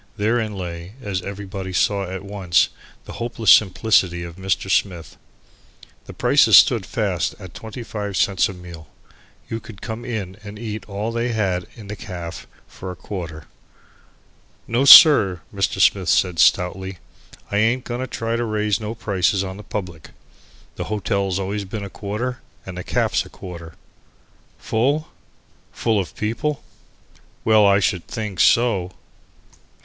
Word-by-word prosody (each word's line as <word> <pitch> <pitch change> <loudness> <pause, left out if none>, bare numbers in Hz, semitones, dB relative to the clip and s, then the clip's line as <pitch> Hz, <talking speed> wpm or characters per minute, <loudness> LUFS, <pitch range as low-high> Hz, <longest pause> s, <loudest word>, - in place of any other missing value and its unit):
Therein 110 0 0
lay, 85 +2 -7
as 100 -7 -3
everybody 100 0 -6
saw 100 +1 0
at 95 +1 -6
once, 95 -4 +1 0.4
the - - -9
hopeless 115 -2 +2
simplicity 95 -3 +3
of 85 -1 -8
Mr. 95 0 -2
Smith. 90 -3 -1 0.9
The - - -10
prices - - +5
stood - - +5
fast - - -1
at - - -11
25 110 -4 -6
cents 95 +4 +2
a - - -6
meal. 85 -4 -11 0.6
You 115 - -4
could 110 -2 -12
come 110 +1 -5
in 105 -6 -5
and 105 0 -9
eat 110 -1 -6
all 105 +3 -3
they 120 +1 -1
had 95 -5 -1
in 110 - -11
the 105 +1 -6
caff 85 -4 -8 0.2
for 95 - -9
a 90 - -6
quarter. 80 -5 -7 1.2
"No, 120 +4 +1
sir," 110 - +9
Mr. 100 -1 -1
Smith 95 -4 +3
said 90 -3 +2
stoutly, 95 +1 +2 0.5
"I 100 - 0
ain't 115 +4 +2
going 120 +1 -4
to 130 - -3
try 115 -1 -3
to 120 - -1
raise 105 -2 0
no 110 +1 -5
prices 95 -3 0
on 95 0 -6
the 105 - -10
public. 90 -6 -6 0.7
The - - -3
hotel's 100 -2 -1
always 100 +1 -3
been 100 +2 -6
a 100 - -9
quarter 120 +5 -4 0.3
and 95 - -7
the - - -5
caff's - - 0
a - - -14
quarter." 85 -3 -10 0.8
Full? 140 +8 0 0.6
Full 110 -3 0
of 95 - -5
people? 135 +7 -2 0.8
Well, 110 -2 +5
I 100 0 +5
should 90 -3 -1
think 105 -6 -5
so! 100 -7 +3
100 Hz, 150 wpm, -21 LUFS, 90-110 Hz, 1.2 s, sir